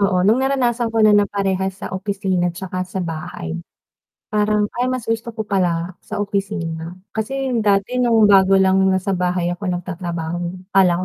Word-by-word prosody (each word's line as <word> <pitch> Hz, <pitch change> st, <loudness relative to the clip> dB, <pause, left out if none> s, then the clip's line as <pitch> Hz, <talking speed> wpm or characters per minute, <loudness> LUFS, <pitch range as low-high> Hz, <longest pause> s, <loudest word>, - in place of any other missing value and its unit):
Oo 185 Hz, -2 st, +2 dB
nung 220 Hz, +6 st, +4 dB
naranasan 250 Hz, -3 st, +1 dB
ko 225 Hz, -1 st, +2 dB
na 215 Hz, -, +6 dB
na 205 Hz, -1 st, +4 dB
parehas 190 Hz, -1 st, -1 dB
sa -, -, -6 dB
opisina 190 Hz, -2 st, -1 dB
tsaka 185 Hz, +1 st, -5 dB
sa 185 Hz, 0 st, -3 dB
bahay, 155 Hz, -, -5 dB, 0.7 s
parang 210 Hz, 0 st, +2 dB, 0.2 s
ay 250 Hz, -, +1 dB
mas 255 Hz, -3 st, -3 dB
gusto 225 Hz, +1 st, -2 dB
ko 220 Hz, -2 st, -5 dB
pala 180 Hz, -3 st, 0 dB
sa -, -, -6 dB
opisina, 185 Hz, -5 st, -3 dB, 0.2 s
kasi 265 Hz, +4 st, -2 dB
dati 205 Hz, +4 st, +1 dB
nung 230 Hz, -3 st, +4 dB
bago 195 Hz, -1 st, +6 dB
lang, 190 Hz, 0 st, +4 dB
nasa 190 Hz, +1 st, 0 dB
bahay 180 Hz, -1 st, 0 dB
ako 185 Hz, +1 st, -4 dB
nagtatrabaho, 175 Hz, 0 st, -4 dB
akala 185 Hz, -3 st, +5 dB
195 Hz, 165 wpm, -20 LUFS, 180-215 Hz, 0.7 s, na